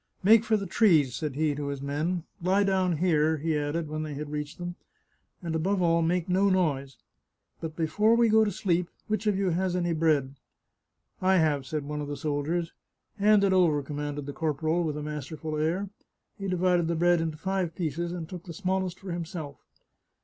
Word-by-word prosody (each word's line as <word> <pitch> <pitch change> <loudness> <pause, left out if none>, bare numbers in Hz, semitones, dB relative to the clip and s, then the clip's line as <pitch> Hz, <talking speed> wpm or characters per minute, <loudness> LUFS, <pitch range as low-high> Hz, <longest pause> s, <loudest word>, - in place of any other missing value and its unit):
" - - -39
Make 220 +3 +7
for 220 -1 +2
the 200 - -4
trees," 165 - +3
said 145 +1 -3
he 155 0 +1
to 145 0 -4
his 140 -1 -3
men. 155 +5 -2
" - - -35
Lie 190 +3 +3
down 185 -4 +1
here," 160 -2 +2
he 160 +1 -1
added 150 +2 -1
when 155 +1 -4
they 155 -2 -5
had 145 +1 -6
reached 150 +1 -4
them, 175 -1 -5 0.4
" - - -36
and, 165 -2 -3
above 190 +5 +1
all, 170 -1 +3
make 170 +1 0
no 190 +2 +3
noise. 145 -8 0 0.6
But 160 -1 -6
before 210 +8 +2
we 235 0 +4
go 220 0 +5
to 215 - +1
sleep, 180 -2 0 0.2
which 215 0 -2
of 205 -2 +2
you 195 -2 +1
has 180 +1 0
any 175 -1 0
bread? 155 -4 +1 0.3
" - - -54
" - - -43
I 190 - +5
have," 150 -5 +1
said 150 -1 -3
one 150 +1 -4
of 145 - -4
the 145 0 -4
soldiers. 155 +3 -2 0.2
" - - -37
Hand 210 0 +5
it 195 -1 +3
over," 165 -6 +3
commanded 145 0 -4
the 145 - -6
corporal, 160 +3 0
with 150 -2 -2
a 150 - -4
mas 150 -3 -5
terful 155 -1 -4
air. 185 +5 -1 0.5
He 195 - -3
divided 180 -2 +2
the 170 - 0
bread 175 0 +3
into 160 -2 -3
five 185 -1 -2
pieces, 170 0 -2
and 170 -2 -5
took 180 -1 -9
the 170 - -7
smallest 185 0 -2
for 190 -2 -7
himself. 165 - -5
165 Hz, 220 wpm, -28 LUFS, 150-185 Hz, 0.6 s, Make